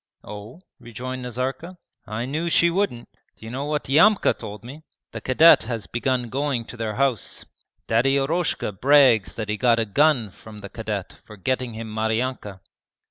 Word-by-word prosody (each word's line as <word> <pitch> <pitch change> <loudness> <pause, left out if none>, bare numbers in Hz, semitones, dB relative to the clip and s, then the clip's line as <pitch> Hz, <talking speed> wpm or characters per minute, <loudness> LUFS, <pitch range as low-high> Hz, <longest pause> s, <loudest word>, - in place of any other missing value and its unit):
'Oh?' 105 - -10 0.2
rejoined 125 +2 -7
Nazarka. 130 +9 -4 0.3
'I 110 +2 -3
knew 155 +6 -2
she 170 +1 +4
wouldn't. 175 -10 -1 0.3
D'you 110 +1 -10
know 135 +3 -4
what 150 0 -2
Yamka 165 +10 +4
told 105 0 -9
me? 135 +6 -10 0.3
The - - -7
cadet 155 +6 +6
has 115 -4 -3
begun 120 +3 -1
going 135 -3 -1
to - - -10
their 110 -2 -4
house. 135 -6 0 0.4
Daddy 125 +5 +2
Eroshka 155 -3 -1
brags 125 -1 +4
that 110 -2 -4
he 105 0 -2
got 120 -1 +3
a 115 - +1
gun 125 -1 +2
from 105 +2 -13
the 100 - -8
cadet 105 -3 -5
for 105 - -13
getting 125 +3 -2
him 110 -1 -7
Maryanka.' 110 -2 -2
125 Hz, 165 wpm, -23 LUFS, 110-140 Hz, 0.4 s, cadet